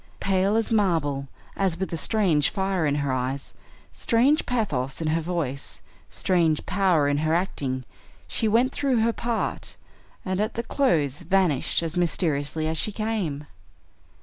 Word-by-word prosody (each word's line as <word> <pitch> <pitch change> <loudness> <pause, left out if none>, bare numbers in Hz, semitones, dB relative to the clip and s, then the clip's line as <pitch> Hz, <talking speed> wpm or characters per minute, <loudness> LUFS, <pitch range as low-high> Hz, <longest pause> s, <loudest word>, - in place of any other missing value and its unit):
Pale 195 +1 +2
as 225 +1 0
marble, 160 -10 +1 0.3
and 190 -4 +1
with 190 0 -4
a - - +1
strange 165 -5 +2
fire 190 -5 0
in 145 - +1
her 135 - 0
eyes, 130 +2 -3 0.4
strange 265 +6 +2
pathos 150 - -1
in 160 -2 -1
her 165 +1 +1
voice, 155 -6 -3 0.3
strange 165 -5 +1
power 180 -7 +2
in 145 0 +1
her 155 +2 +1
acting, 135 -8 -1 0.4
she 225 - +1
went 235 +5 +3
through 270 -5 +1
her 230 +1 +2
part, 235 0 -3 0.5
and 185 +1 -1
at 215 - -2
the 235 - -2
close 155 - +1
vanished 175 -4 +1
as 165 +1 -3
mysteriously 155 -3 0
as 160 0 -1
she 215 - -1
came. 205 -10 -2
175 Hz, 150 wpm, -25 LUFS, 150-210 Hz, 0.5 s, went